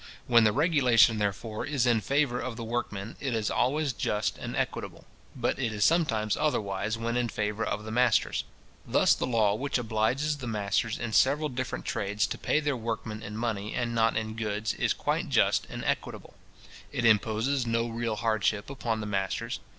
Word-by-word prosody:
When 115 -2 +5
the 105 - +5
regulation, 125 - +4
therefore, 105 +2 -2
is 140 -4 0
in 120 -3 +3
favour 135 +2 +1
of 130 -2 -4
the 115 - -5
workmen, 110 -2 -4
it 135 -4 -2
is 110 -2 -1
always 140 +2 +1
just 105 -2 -1
and - - -5
equitable; - - -3 0.3
but - - -1
it 120 -4 0
is 105 -1 +1
sometimes 115 -11 +2
otherwise 105 -7 -1
when 115 +1 -2
in 120 -1 0
favour 105 +1 -2
of 105 +1 -2
the 110 - -6
masters. 125 +2 +2 0.4
Thus - - +4
the - - -2
law 110 -4 +3
which 135 +6 -1
obliges 125 +6 0
the 130 -3 -6
masters 105 +1 -1
in 110 - -4
several 145 +6 +3
different 130 0 -4
trades 105 +1 0
to - - -5
pay - - +1
their 145 -2 0
workmen 110 -2 -4
in 105 0 -7
money, 110 -3 -2
and 120 -1 -1
not 115 -1 +2
in 110 0 -3
goods, 110 -1 -2
is - - 0
quite - - -1
just - - +2
and - - -6
equitable. - - -3 0.6
It 120 - -1
imposes 115 +4 +2
no 115 0 +1
real 115 -1 -2
hardship 110 0 0
upon 115 -5 -2
the - - -4
masters. 105 +3 -2
115 Hz, 185 wpm, -28 LUFS, 105-125 Hz, 0.6 s, When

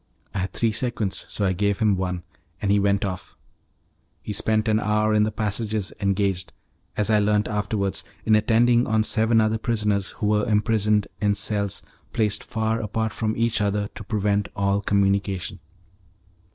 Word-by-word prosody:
I 100 - -2
had 95 +1 -3
three 115 -1 +1
sequins 110 -3 -2
so 105 - -1
I 95 - +2
gave 100 +2 0
him 105 -3 +2
one, 90 -1 -3 0.4
and 100 - 0
he 100 - +4
went 100 0 +2
off. 95 -2 -6 0.9
He 105 - -4
spent 110 +2 +1
an 110 0 +3
hour 105 0 +1
in 105 0 +4
the 110 - -2
passages 105 -1 -2
engaged, 100 -2 0 0.4
as 105 +1 +1
I 105 - +5
learnt 105 0 +2
afterwards, 105 -2 -1 0.2
in 110 - +5
attending 120 +2 +3
on 110 0 +2
seven 110 +1 +3
other 110 0 +1
prisoners 105 -4 0
who - - -4
were 105 0 +2
imprisoned 105 -1 +2
in 105 -1 +2
cells 100 -1 0 0.3
placed 105 -3 +1
far 110 0 -1
apart 110 +1 -2
from 110 -1 -2
each 115 -1 +1
other 100 0 0
to - - -8
prevent 100 -1 0
all 100 0 +1
communication. 100 -1 0
105 Hz, 165 wpm, -24 LUFS, 100-110 Hz, 0.9 s, I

